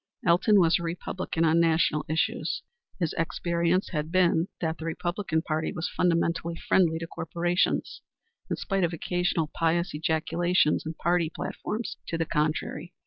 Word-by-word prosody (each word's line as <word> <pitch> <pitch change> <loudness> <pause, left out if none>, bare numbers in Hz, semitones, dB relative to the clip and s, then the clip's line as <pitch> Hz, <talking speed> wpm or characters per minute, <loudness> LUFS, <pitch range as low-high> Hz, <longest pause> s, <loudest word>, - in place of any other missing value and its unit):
Elton 185 +5 +5
was 165 -2 +4
a - - -6
Republican 170 0 -2
on 160 +1 +4
national 160 -2 +3
issues. 160 +1 -1 0.4
His 170 -4 0
experience 170 +2 0
had 155 -1 -3
been 175 -2 +3
that 160 -1 -2
the 160 - -6
Republican 170 0 -1
Party 155 -1 -1
was 170 -1 -3
fundamentally 170 -1 +1
friendly 165 -1 +2
to 165 - -4
corporations, 170 +2 -1 0.5
in - - 0
spite 195 -2 -1
of 170 0 +1
occasional 170 -1 -1
pious 170 +2 +1
ejaculations 160 +1 +1
in 160 - -4
party 170 -1 +1
platforms 220 +7 -4
to 165 - -2
the 165 - 0
contrary. 155 +2 -2
170 Hz, 145 wpm, -27 LUFS, 160-175 Hz, 0.5 s, Elton